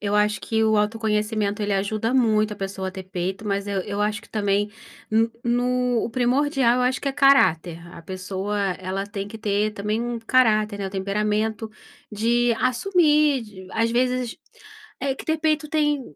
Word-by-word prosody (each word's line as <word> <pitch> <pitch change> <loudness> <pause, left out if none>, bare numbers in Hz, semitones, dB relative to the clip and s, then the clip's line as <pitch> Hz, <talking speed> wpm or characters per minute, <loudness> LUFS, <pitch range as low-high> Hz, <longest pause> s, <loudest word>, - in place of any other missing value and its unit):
eu 205 0 -1
acho 210 0 +2
que 220 -1 0
o 220 -1 +3
autoconhecimento 210 -1 0
ele 205 0 0
ajuda 215 +4 -1
muito 215 -4 +2
a - - -7
pessoa 195 -1 -4
a - - -4
ter 190 0 -8
peito, 190 +2 -4
mas 200 0 -1
eu 200 -1 -1
eu 205 +1 -3
acho 210 +1 -1
que - - -18
também 205 -1 0 0.7
no 245 0 +1
o - - -4
primordial 255 +1 +2
eu 250 - +1
acho 255 +1 +1
que 280 - -1
é - - -2
caráter, 185 - +4 0.2
a - - -11
pessoa 190 +3 -4 0.2
ela 190 +1 -3
tem 200 -1 -5
que 220 - -9
ter 210 0 0
também 210 +2 -2
um 240 0 -3
caráter, 220 -3 +2
né, 200 - -3
o - - -6
temperamento, 210 +3 -1 0.4
de 235 +3 +2
assumir, 300 - +3
de 195 -4 -12
às 230 +1 +1
vezes, 250 0 0 0.6
tem 275 -1 -2
que - - -9
ter 315 0 0
peito 310 -1 0
tem 295 -2 +1
215 Hz, 180 wpm, -23 LUFS, 200-250 Hz, 0.7 s, caráter